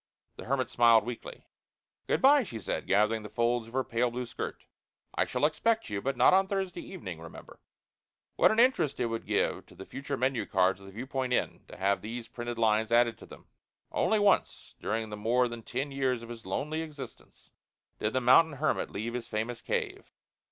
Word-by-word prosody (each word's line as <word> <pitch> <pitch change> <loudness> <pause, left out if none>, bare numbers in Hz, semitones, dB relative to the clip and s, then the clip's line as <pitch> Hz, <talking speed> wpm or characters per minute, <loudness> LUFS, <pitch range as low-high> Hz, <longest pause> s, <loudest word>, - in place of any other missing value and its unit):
The - - -8
hermit 130 -1 -1
smiled 115 -3 +5
weakly. 120 -1 -7 0.6
"Good - - 0
bye," 285 +2 +7
she 120 - -6
said, - - -3
gathering 105 +3 +3
the 105 - -8
folds 120 -1 0
of 115 - -14
her 130 0 +1
pale 120 +1 0
blue 125 +1 -4
skirt. - - -6 0.5
"I - - +1
shall - - 0
expect 225 - +1
you. 100 -1 -2
But 135 +1 -2
not - - +6
on 190 +1 +4
Thursday 190 -3 -2
evening, 95 - -8
remember." 85 - -12 0.8
What - - +5
an 220 - +1
interest 230 - +3
it 125 - +1
would 115 -1 -4
give - - 0
to - - -17
the 95 - -9
future 140 0 -5
menu 130 -2 0
cards 95 0 +2
of 100 - -13
the - - -10
Viewpoint 130 +3 -3
Inn - - -1
to - - -11
have 100 +1 +1
these 115 +2 -6
printed 120 0 -6
lines 110 0 +2
added 120 -1 +4
to - - -12
them: - - -13 0.5
"Only 220 - +2
once 205 -1 +1
during 110 -1 -2
the 105 - -5
more 120 +4 +2
than 120 -1 -7
ten 135 +5 -4
years 130 -3 0
of 115 - -10
his 115 -4 -9
lonely 150 +11 -2
existence 150 -4 -10 0.5
did 105 - -1
the 130 - +1
mountain 145 +6 +6
hermit 145 +3 -1
leave 110 +4 -4
his 120 -1 -4
famous 115 +2 -3
cave. - - -3
120 Hz, 200 wpm, -30 LUFS, 110-140 Hz, 0.8 s, bye